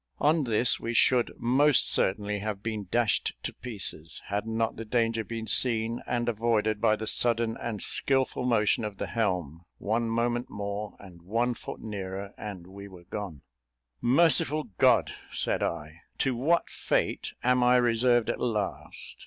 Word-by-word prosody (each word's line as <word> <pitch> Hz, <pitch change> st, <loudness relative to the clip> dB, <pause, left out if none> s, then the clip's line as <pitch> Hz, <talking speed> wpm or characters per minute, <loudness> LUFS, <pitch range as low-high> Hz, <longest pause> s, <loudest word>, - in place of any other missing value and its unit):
On 150 Hz, +1 st, +2 dB
this 115 Hz, +1 st, +3 dB
we 115 Hz, +1 st, -4 dB
should 125 Hz, +1 st, +3 dB
most 135 Hz, +4 st, +4 dB
certainly 105 Hz, +1 st, +1 dB
have 105 Hz, -1 st, -5 dB
been 110 Hz, -3 st, -4 dB
dashed 120 Hz, 0 st, +1 dB
to -, -, -4 dB
pieces, 95 Hz, -9 st, -2 dB
had 100 Hz, +2 st, -2 dB
not 115 Hz, 0 st, -1 dB
the 115 Hz, -, -6 dB
danger 115 Hz, 0 st, 0 dB
been 115 Hz, 0 st, -6 dB
seen 115 Hz, -1 st, +2 dB
and 120 Hz, -1 st, -1 dB
avoided 110 Hz, -2 st, 0 dB
by 110 Hz, -, +3 dB
the 110 Hz, +1 st, -6 dB
sudden 115 Hz, 0 st, +2 dB
and 110 Hz, -4 st, -2 dB
skilful 135 Hz, -2 st, +1 dB
motion 115 Hz, -2 st, +2 dB
of 105 Hz, -2 st, -5 dB
the -, -, -3 dB
helm; 90 Hz, -9 st, -2 dB, 0.2 s
one 115 Hz, +2 st, -1 dB
moment 120 Hz, +1 st, -1 dB
more, 100 Hz, +1 st, -5 dB
and 90 Hz, -4 st, -14 dB
one 115 Hz, +7 st, -1 dB
foot -, -, -9 dB
nearer, 100 Hz, -1 st, -6 dB
and 100 Hz, -5 st, -8 dB
we 100 Hz, +2 st, -11 dB
were 90 Hz, -3 st, -14 dB
gone. 95 Hz, -9 st, -6 dB, 0.6 s
"Merciful 155 Hz, +1 st, +4 dB
God!" -, -, +4 dB, 0.2 s
said -, -, -2 dB
I, 75 Hz, +3 st, -4 dB, 0.2 s
"to 130 Hz, -2 st, 0 dB
what 160 Hz, +8 st, +1 dB
fate -, -, -2 dB
am 125 Hz, 0 st, +3 dB
I 125 Hz, 0 st, +4 dB
reserved 120 Hz, -1 st, +3 dB
at -, -, -6 dB
last? 95 Hz, -, -3 dB
115 Hz, 160 wpm, -27 LUFS, 100-120 Hz, 0.6 s, most